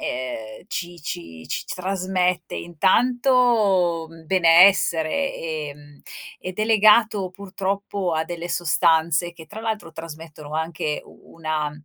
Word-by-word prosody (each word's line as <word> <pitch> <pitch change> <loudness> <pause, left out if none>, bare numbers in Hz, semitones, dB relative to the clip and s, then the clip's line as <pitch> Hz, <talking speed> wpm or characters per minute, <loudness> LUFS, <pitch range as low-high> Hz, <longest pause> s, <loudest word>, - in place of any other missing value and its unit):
ehm, 125 -1 -5
ci 175 -4 -5
ci 85 - -7
ci - - -3
s - - -4
trasmette 185 -1 -1
intanto 200 - +2 0.2
benessere, 180 - +4
ehm, 145 -3 -7 0.4
ed 185 +2 -7
è 215 - +2
legato 215 -2 +4
purtroppo 195 -1 -3
a 160 0 0
delle 175 0 -6
sostanze 170 0 +2
che, 165 -1 -12
tra 215 +1 -9
l'altro, 215 -7 -4
trasmettono 160 -2 -10
anche 160 -1 -2
u - - -18
una 155 -2 -2
175 Hz, 115 wpm, -23 LUFS, 160-195 Hz, 0.4 s, benessere